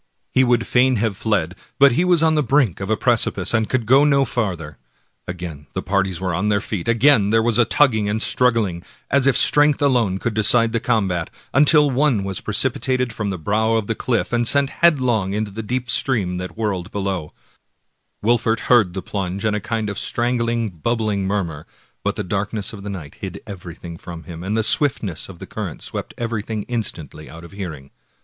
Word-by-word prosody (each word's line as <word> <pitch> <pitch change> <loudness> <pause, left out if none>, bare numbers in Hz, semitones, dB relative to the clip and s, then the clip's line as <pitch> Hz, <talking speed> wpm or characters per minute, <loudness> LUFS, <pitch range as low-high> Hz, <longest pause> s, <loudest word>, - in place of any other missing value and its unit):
He 130 - +4
would 120 -2 +2
fain 130 +1 +3
have 110 -2 -1
fled, 95 -5 -1 0.2
but 140 0 +6
he 145 +9 +1
was 175 -3 +3
on 160 -1 +4
the 155 - +2
brink 130 - +1
of 95 +1 -5
a 110 - +1
precipice, 115 -6 +1
and 110 -2 +1
could 130 -3 0
go 135 +5 +5
no 140 -2 +3
farther. 90 - -3 0.5
Again 85 -5 -7
the - - -3
parties 95 -3 0
were 90 -1 -2
on 95 +6 0
their 100 -1 +2
feet, 100 -4 -5
again 115 -2 +4
there 110 +1 +3
was 120 0 +2
a 120 - +5
tugging 110 -8 +2
and 110 +2 -1
struggling, 115 -8 +1 0.3
as 140 -1 +4
if 130 -3 +4
strength 145 +1 +4
alone 120 -9 +2
could 115 +3 -3
decide 115 +2 +4
the 115 - 0
combat, 95 -8 0 0.2
until 150 +1 +5
one 130 -6 +2
was 95 -2 -3
precipitated 125 +2 0
from 105 -2 -3
the 95 - -3
brow 110 +6 0
of 110 -2 +1
the 115 - -1
olifif, 120 +2 -2
and 120 -1 +2
sent 140 +1 +3
headlong 125 - +2
into 105 0 -2
the 110 +3 -5
deep 125 +3 -3
stream 105 -8 -1
that 90 +3 -7
whirled 100 -5 -2
below, 95 -6 -3 0.9
Wolfert 115 0 +2
heard 110 -8 +3
the 95 - -4
plunge, 95 0 -4
and 105 -1 +1
a - - -1
kind 110 0 -3
of 100 - -3
strangling, 120 -1 -1
bub 105 +8 -2
bling 105 -3 -1
murmur, 85 -7 -3 0.4
but - - -1
the - - -3
darkness 100 +3 -2
of 105 - -9
the 100 - -6
night 80 -7 -8
hid 95 0 -6
everything 85 -4 -9
from 85 -1 -9
him, 85 +1 -9
and 105 +4 -2
the 110 - +1
swiftness 110 - +1
of - - -10
the - - -9
current - - -6
swept - - -6
everything 110 -2 -3
instantly 85 - -5
out 85 +1 -11
of 85 - -12
hearing. 80 -9 -8
110 Hz, 200 wpm, -20 LUFS, 95-120 Hz, 0.9 s, but